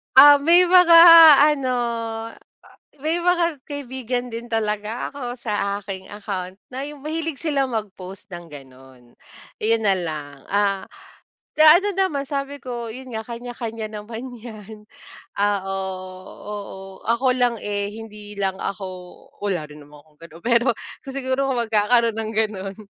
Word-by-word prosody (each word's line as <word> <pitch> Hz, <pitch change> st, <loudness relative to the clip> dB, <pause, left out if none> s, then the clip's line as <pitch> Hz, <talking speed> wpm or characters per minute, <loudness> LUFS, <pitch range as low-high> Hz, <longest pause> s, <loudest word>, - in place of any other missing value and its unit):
Ah, 290 Hz, +2 st, +10 dB
may 350 Hz, +3 st, +5 dB
mga 360 Hz, -2 st, +7 dB, 0.6 s
ano, 260 Hz, -3 st, -2 dB, 1.3 s
may 320 Hz, +4 st, -1 dB
mga 340 Hz, -5 st, +1 dB
kaibigan 255 Hz, -3 st, -4 dB
din 235 Hz, 0 st, -8 dB
talaga 215 Hz, 0 st, -2 dB
ako 245 Hz, -3 st, -6 dB
sa 205 Hz, -3 st, -2 dB
aking 190 Hz, -2 st, -8 dB
account 195 Hz, -3 st, -6 dB
na 260 Hz, +2 st, -7 dB
yung 295 Hz, 0 st, -8 dB
mahilig 310 Hz, 0 st, -4 dB
sila 290 Hz, -4 st, 0 dB
mag-post 195 Hz, -3 st, -6 dB
ng 175 Hz, -1 st, -10 dB
gano'n. 130 Hz, -3 st, -15 dB, 0.5 s
Ayun 225 Hz, 0 st, +1 dB
nalang, 155 Hz, -7 st, -2 dB
ah, 200 Hz, -1 st, +1 dB, 0.8 s
ano 325 Hz, +6 st, +7 dB
naman, 375 Hz, -8 st, -1 dB
sabi 280 Hz, 0 st, -5 dB
ko, 240 Hz, -2 st, -5 dB
yun 255 Hz, +3 st, -9 dB
nga 220 Hz, -1 st, -6 dB
kanya-kanya 235 Hz, -2 st, -6 dB
naman 230 Hz, +4 st, -8 dB
yan. 215 Hz, -2 st, -11 dB, 0.5 s
Oo, 200 Hz, -1 st, 0 dB, 0.6 s
oo, 205 Hz, -1 st, -8 dB, 0.3 s
ako 235 Hz, +3 st, +2 dB
lang 245 Hz, -3 st, 0 dB
eh, 205 Hz, 0 st, -3 dB
hindi 210 Hz, -2 st, -10 dB
lang 195 Hz, -1 st, -2 dB
ako 195 Hz, 0 st, -4 dB, 0.5 s
wala 175 Hz, -7 st, -3 dB
rin 150 Hz, -1 st, -13 dB
naman 145 Hz, 0 st, -16 dB
akong 150 Hz, -1 st, -30 dB
gano'n. 165 Hz, +1 st, -16 dB
Pero 235 Hz, +1 st, +2 dB, 0.4 s
kung 270 Hz, -, -7 dB
siguro 270 Hz, 0 st, -1 dB
kung 250 Hz, -3 st, 0 dB
magkakaroon 225 Hz, +1 st, +2 dB
ng 220 Hz, 0 st, -3 dB
gano'n, 200 Hz, -3 st, -2 dB
225 Hz, 135 wpm, -22 LUFS, 200-265 Hz, 1.3 s, Ah